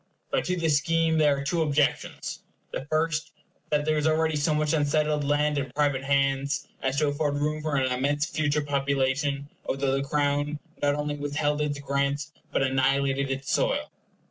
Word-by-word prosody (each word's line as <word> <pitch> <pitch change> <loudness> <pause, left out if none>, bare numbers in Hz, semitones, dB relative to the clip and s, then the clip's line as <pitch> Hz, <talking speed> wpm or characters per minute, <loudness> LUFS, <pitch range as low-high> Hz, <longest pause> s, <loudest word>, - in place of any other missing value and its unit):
But - - +1
to 180 - 0
this 160 -4 +3
scheme 165 +1 +1
there 145 -2 +4
are 140 - -3
two 165 +4 0
objections. 150 -2 0 0.3
The - - -4
first, 155 +1 0 0.4
that 150 -1 +1
there 155 0 +2
is 150 - +1
already 160 0 +2
so 150 +2 +1
much 150 0 +1
unsettled 150 0 +1
land 145 +1 +1
in 135 -1 -3
private 145 -2 +1
hands 140 0 +1
as 135 +1 -1
to 150 0 +3
afford 145 0 0
room 150 +1 -1
for 155 -2 -1
an 130 -2 +1
immense 145 +4 +1
future 150 -2 0
population, 140 0 0 0.2
although 135 0 -1
the 135 +1 +1
Crown 145 +1 0 0.2
not 145 0 +2
only 150 0 -2
withheld 145 +1 -1
its 145 -1 -1
grants, 140 +1 -1 0.2
but - - +1
annihilated 135 +1 +1
its 135 0 -3
soil. - - +1
145 Hz, 175 wpm, -27 LUFS, 140-150 Hz, 0.4 s, there